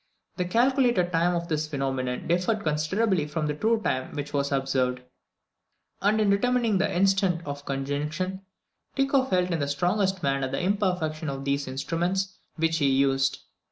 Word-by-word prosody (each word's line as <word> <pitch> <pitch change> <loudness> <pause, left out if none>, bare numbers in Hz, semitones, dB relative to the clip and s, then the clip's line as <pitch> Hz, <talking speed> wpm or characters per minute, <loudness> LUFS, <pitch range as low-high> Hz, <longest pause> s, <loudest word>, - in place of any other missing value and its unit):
The 180 - 0
calculated 240 -3 +2
time 175 +1 +2
of 170 0 -2
this 155 -1 -1
phenomenon 135 -3 -2
differed 180 +6 +1
considerably 155 +3 +1
from 155 +1 -2
the 150 - 0
true 220 +9 +1
time 130 +2 -2
which 145 0 -5
was 140 0 0
observed; 130 -2 0 1.0
and 210 +2 +3
in 210 -2 +3
determining 230 0 +2
the 200 - +1
instant 190 -2 +2
of 145 0 -6
conjunction 150 +7 -3 0.5
Tycho 270 -1 +2
felt 180 -6 +1
in 165 - 0
the 140 - -1
strongest 180 +5 0
manner 135 -1 +1
the - - -2
imperfection 180 -6 0
of 135 0 -5
the 140 - +2
instruments 170 +8 -2 0.2
which 165 0 +1
he 140 -3 +2
used. 135 0 +2
165 Hz, 155 wpm, -26 LUFS, 140-195 Hz, 1.0 s, and